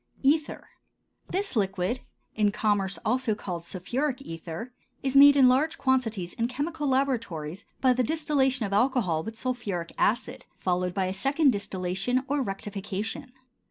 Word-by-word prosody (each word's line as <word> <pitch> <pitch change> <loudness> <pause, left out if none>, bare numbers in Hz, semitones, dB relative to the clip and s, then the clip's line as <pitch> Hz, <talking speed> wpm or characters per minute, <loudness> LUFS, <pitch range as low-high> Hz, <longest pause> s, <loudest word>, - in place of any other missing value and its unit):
ETHER. 290 +2 +1 0.6
This 395 -3 -2
liquid, 195 +2 0 0.3
in 210 -1 +2
commerce 200 -3 0
also 245 -1 +1
called 175 -5 -5
sulphuric 255 +10 -2
ether, 165 +6 -7 0.3
is 270 0 -1
made 285 +1 +9
in 265 -2 +7
large 280 +6 +3
quantities 225 -9 0
in 230 - 0
chemical 295 +4 -3
laboratories 230 - -1 0.2
by 255 -1 +5
the 250 - +1
distillation 270 -4 +1
of 200 - -4
alcohol 210 -8 +2
with 225 +3 -7
sulphuric 220 -10 -3
acid, 250 +3 0
followed 180 -1 -1
by 190 -2 +1
a 185 - -2
second 275 +8 +3
distillation 195 +4 -1
or 290 0 0
rectification. 205 +3 -4
235 Hz, 140 wpm, -27 LUFS, 195-265 Hz, 0.6 s, made